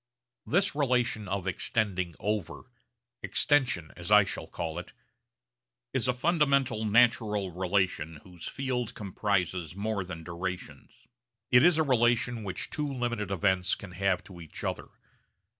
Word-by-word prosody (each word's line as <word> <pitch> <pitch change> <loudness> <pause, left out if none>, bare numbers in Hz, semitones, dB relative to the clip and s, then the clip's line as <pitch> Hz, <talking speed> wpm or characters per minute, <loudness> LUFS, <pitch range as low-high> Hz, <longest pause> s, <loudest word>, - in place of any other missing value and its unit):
This 195 +5 +2
relation 125 -7 +1
of 95 -1 -2
'extending 95 -2 0
over' 100 -5 -2 0.6
'extension' 120 - +1
as 85 +1 -7
I 105 -1 +8
shall 95 - -5
call 85 0 -4
it 90 - -10 1.0
is - - 0
a 125 - +3
fundamental 140 -6 +2
natural 105 -3 +3
relation 90 -3 0
whose 90 -3 -9
field 125 -4 -3
comprises 95 -4 -1
more 100 0 -2
than 85 -3 -8
durations. 90 +2 -5 0.6
It 125 - +8
is 175 -1 +6
a 160 - +4
relation 120 -3 +2
which 95 -2 -4
two 150 -2 -2
limited 120 -6 -2
events 95 -1 +2
can 100 - -10
have 95 0 0
to 90 -3 -12
each 80 - -9
other. - - -3
105 Hz, 135 wpm, -29 LUFS, 90-125 Hz, 1.0 s, I